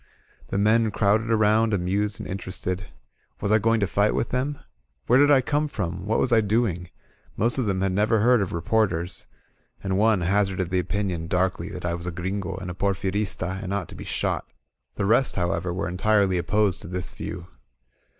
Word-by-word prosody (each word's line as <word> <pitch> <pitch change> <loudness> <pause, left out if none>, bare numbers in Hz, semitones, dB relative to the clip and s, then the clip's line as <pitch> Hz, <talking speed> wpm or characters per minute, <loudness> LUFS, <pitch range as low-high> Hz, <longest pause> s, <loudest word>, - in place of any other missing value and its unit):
The - - -3
men 110 +2 +3
crowded 105 +2 +1
around, 110 0 +3
amused 100 +3 -1
and - - -6
interested. 95 0 -4 0.5
Was 100 - -1
I 110 - +5
going 115 +2 +2
to - - +3
fight 100 +2 +1
with - - -1
them? 135 +3 -1 0.5
Where 125 +2 +4
did 145 +1 +5
I 140 -2 +6
come 145 +4 0
from? 95 - -4
What 110 - +1
was 125 - +2
I 115 - +5
doing? 100 -5 0 0.5
Most 120 +5 +3
of 120 - 0
them 95 -2 0
had 95 -1 +1
never 105 +4 +2
heard 120 0 +4
of 95 - -2
re 85 - -3
porters, 95 -6 0 0.6
and 95 0 0
one 110 -3 +3
hazarded 95 0 0
the 95 - +2
opinion 90 -3 -2
darkly 90 0 0
that 90 -3 -7
I 85 - 0
was 85 +1 -5
a - - -2
Gringo 95 +2 -3
and 90 -1 -6
a - - -5
Porfirista, 95 -1 -2
and 95 - -5
ought 95 -5 -3
to - - -9
be - - -8
shot. - - -2 0.5
The 100 - -1
rest, 120 +6 +2
however, 85 -1 -1
were 90 +3 -2
entirely 95 0 +2
opposed 100 +2 +1
to - - -8
this 90 +1 -4
view. 90 +1 -7
100 Hz, 200 wpm, -25 LUFS, 90-110 Hz, 0.6 s, I